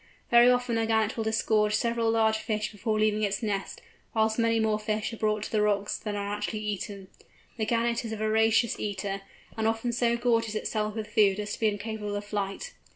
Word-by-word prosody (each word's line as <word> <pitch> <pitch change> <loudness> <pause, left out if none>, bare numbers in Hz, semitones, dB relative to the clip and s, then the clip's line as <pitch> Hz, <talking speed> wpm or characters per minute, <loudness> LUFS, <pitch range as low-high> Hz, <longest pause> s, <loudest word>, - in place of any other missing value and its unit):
Very 240 +1 +7
often 245 -2 +1
a 225 - 0
Gannet 220 -1 +1
will 225 - -2
disgorge 220 -1 +2
several 230 0 +1
large 220 -1 +3
fish 215 -1 -2
before 215 +1 -1
leaving 215 0 +2
its 200 +1 -1
nest, 200 -3 -3 0.3
whilst 220 +1 +2
many 230 0 +3
more 215 -1 +1
fish 215 +1 -2
are - - -6
brought 215 -1 0
to - - -6
the 215 - +2
rocks 205 -1 +1
than 210 -1 -4
are 200 0 -3
actually 210 +1 -3
eaten. 200 -2 -4 0.5
The 220 -2 -1
Gannet 235 +1 +1
is 225 - -5
a 220 - -3
voracious 220 +2 +2
eater, 195 -1 -3 0.3
and 220 0 0
often 225 +2 0
so 235 0 +1
gorges 230 -2 +1
itself 215 0 -2
with 215 -1 -6
food 200 -2 +4
as 210 0 -3
to - - -6
be 220 - +3
incapable 210 0 -3
of 205 0 -4
flight. 205 - -4
215 Hz, 210 wpm, -28 LUFS, 210-225 Hz, 0.5 s, Very